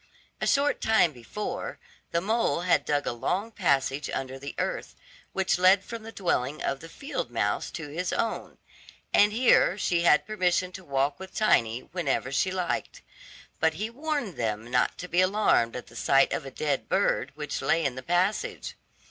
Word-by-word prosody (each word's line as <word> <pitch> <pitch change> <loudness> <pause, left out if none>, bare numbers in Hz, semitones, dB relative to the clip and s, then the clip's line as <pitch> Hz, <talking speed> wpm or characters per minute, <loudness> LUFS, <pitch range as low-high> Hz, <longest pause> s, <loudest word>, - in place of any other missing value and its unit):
A - - 0
short 285 +1 +2
time 220 -7 +4
before, 130 - -5 0.3
the 170 - 0
mole 220 -2 +1
had 180 0 +2
dug 145 -1 0
a - - 0
long 185 - -2
passage 140 -7 0
under 135 0 -4
the 140 +1 -7
earth, - - -3 0.4
which 190 -2 +1
led 185 +2 +5
from 230 +1 -7
the 225 +1 -9
dwelling 150 - -1
of 135 - -1
the 165 - -11
field 275 - -5
mouse 105 -4 -1
to 160 - -6
his 170 +5 -3
own, 230 - -2 0.6
and 205 +1 +6
here 225 -5 +4
she 175 -4 +1
had 150 -3 +4
permission 185 -3 0
to 190 0 -9
walk 140 -1 0
with 190 0 -10
Tiny 120 - +2
whenever 140 -5 -2
she 185 - +1
liked. 185 -2 -3 0.6
But 160 0 +2
he 215 +6 -3
warned 285 - -3
them 110 0 -3
not 125 0 +2
to 180 - -6
be 180 +1 +2
alarmed 185 - +2
at 125 - -6
the 115 - -17
sight 135 +3 +3
of 135 - -3
a - - -5
dead 145 0 -2
bird - - +1
which - - -4
lay 165 -1 +2
in 135 - 0
the 130 - -7
passage. 180 +7 -1
175 Hz, 180 wpm, -27 LUFS, 135-200 Hz, 0.6 s, and